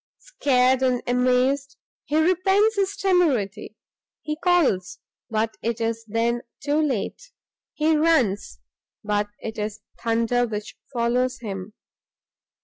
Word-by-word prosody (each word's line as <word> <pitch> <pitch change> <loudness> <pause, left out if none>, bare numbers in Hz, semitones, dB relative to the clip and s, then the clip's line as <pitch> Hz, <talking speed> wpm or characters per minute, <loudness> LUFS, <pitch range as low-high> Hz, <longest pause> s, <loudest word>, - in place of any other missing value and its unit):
Scared 260 - +2
and 255 -2 +1
amazed, 255 +3 +1 0.3
he 300 - 0
repents 385 +6 +3
his 400 0 0
temerity; 260 - +1 0.5
he 305 - -2
calls, 305 - +1 0.3
but 220 0 -1
it 235 0 -2
is 230 0 -2
then 230 +2 0 0.2
too 295 +2 +1
late; 300 - -2 0.4
he 310 +1 +2
runs, 300 -11 +2 0.5
but 210 0 0
it 220 -1 -6
is 210 +1 -4 0.2
thunder 230 +1 +1
which 210 -1 -6 0.2
follows 250 +1 0
him! 195 -2 -6
250 Hz, 115 wpm, -24 LUFS, 220-305 Hz, 0.5 s, repents